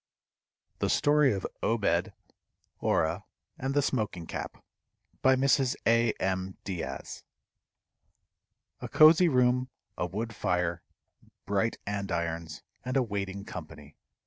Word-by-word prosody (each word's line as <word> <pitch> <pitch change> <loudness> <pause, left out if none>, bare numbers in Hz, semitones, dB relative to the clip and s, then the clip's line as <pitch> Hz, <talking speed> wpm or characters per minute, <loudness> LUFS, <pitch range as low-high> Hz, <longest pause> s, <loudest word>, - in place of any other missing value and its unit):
THE - - 0
STORY 145 -1 +4
OF 95 -3 -2 0.2
OBED, 100 -6 +1 0.7
ORAH, 80 - +1 0.4
AND 135 +2 -2
THE 145 - +3
SMOKING 105 -10 -1
CAP. - - -6 0.6
BY 130 0 +5
MRS. 135 -1 +2
A. 115 0 +4
M. 95 0 -2
DIAZ. 90 -4 -5 1.6
A - - -6
cozy 160 +3 +7
room, 125 -1 +2 0.3
a 90 - 0
wood 110 +5 -4
fire, 90 -4 -1 0.6
bright 100 +3 0
andirons, 85 -6 -3 0.2
and 130 +2 -1
a 130 - +3
waiting 100 -3 -4
company. 75 -6 -9
105 Hz, 110 wpm, -29 LUFS, 90-130 Hz, 1.6 s, cozy